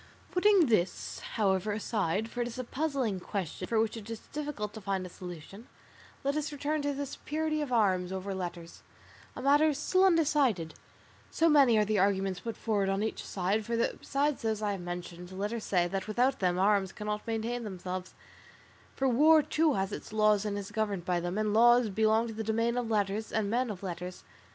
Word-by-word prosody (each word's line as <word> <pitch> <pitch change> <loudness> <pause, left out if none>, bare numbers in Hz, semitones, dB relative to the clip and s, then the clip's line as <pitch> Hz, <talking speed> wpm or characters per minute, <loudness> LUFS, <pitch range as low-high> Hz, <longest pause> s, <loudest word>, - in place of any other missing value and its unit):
"Putting 380 -1 +5
this, 215 -8 0 0.2
however, 200 -1 +1
aside, 210 -1 -1
for 240 +1 -4
it 240 - -1
is 240 - -8
a 255 - -3
puzzling 260 -6 -1
question 185 -1 -4
for 225 - +1
which 220 0 0
it 225 -1 -8
is 225 -1 -6
difficult 290 -9 -4
to 220 - -8
find 195 -1 -2
a - - -7
solution, 180 +5 -10 0.6
let 280 +1 0
us 305 0 -2
return 295 +1 -2
to 285 0 0
the 285 0 -3
superiority 310 +2 -2
of 290 -4 -4
arms 190 -6 +2
over 190 +1 -4
letters, 175 -2 -6 0.5
a 255 - -6
matter 295 +3 +5
still 370 +6 +2
undecided, 285 - +2 0.6
so 330 - +2
many 275 -7 +6
are 210 - +3
the 210 0 +1
arguments 195 -1 +1
put 230 +3 -6
forward 205 -4 0
on 195 +2 0
each 220 - -3
side; 195 +3 -1
for 235 +2 -2
besides 280 +4 0
those 220 -2 -1
I 205 - +1
have 195 -2 -4
mentioned, 175 0 -7
letters 210 +4 -3
say 175 -3 +2
that 195 +3 -3
without 245 +5 +1
them 180 -2 +1
arms 195 0 +2
cannot 210 +1 -4
maintain 230 +2 -2
themselves, 185 -2 -6 0.8
for 270 - +1
war, 305 +5 +6
too, 310 0 +2
has 195 +1 -1
its - - -7
laws 215 -1 +3
and 205 -1 -2
is 205 0 -6
governed 205 -5 -2
by 180 -1 +1
them, 175 +3 -3
and 215 -1 0
laws 240 +1 +5
belong 220 +3 +2
to 225 - -6
the 220 +1 -4
domain 230 +2 0
of 245 -2 -2
letters 210 0 -1
and 210 -2 0
men 245 +1 +1
of 200 -2 -6
letters. 180 0 -6
215 Hz, 200 wpm, -30 LUFS, 190-250 Hz, 0.8 s, many